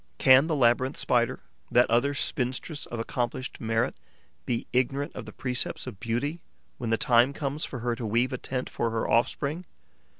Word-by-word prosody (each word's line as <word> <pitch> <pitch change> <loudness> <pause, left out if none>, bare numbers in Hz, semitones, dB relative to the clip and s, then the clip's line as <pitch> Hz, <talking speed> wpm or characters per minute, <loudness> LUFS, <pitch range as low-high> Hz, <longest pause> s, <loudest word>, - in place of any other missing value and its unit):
Can 130 +3 +6
the 160 - 0
Labyrinth 130 +1 +3
Spider, 120 +2 +1 0.3
that 125 +1 +5
other 125 +5 +2
spinstress 135 +4 -1
of 120 - -5
accomplished 120 +2 -3
merit, 115 -1 0 0.5
be 120 -2 -1
ignorant 135 +3 +1
of - - -7
the - - -7
precepts 125 -1 -3
of 120 -7 -8
beauty 130 +9 -2 0.4
when 120 -3 -3
the 115 - +2
time 120 +4 +4
comes 145 +1 -3
for 125 - -7
her 120 0 0
to 115 -1 -4
weave 120 +4 +1
a 130 - -3
tent 125 -1 -3
for 115 - -1
her 115 0 -1
offspring? 140 +8 +1
125 Hz, 175 wpm, -27 LUFS, 120-140 Hz, 0.5 s, Can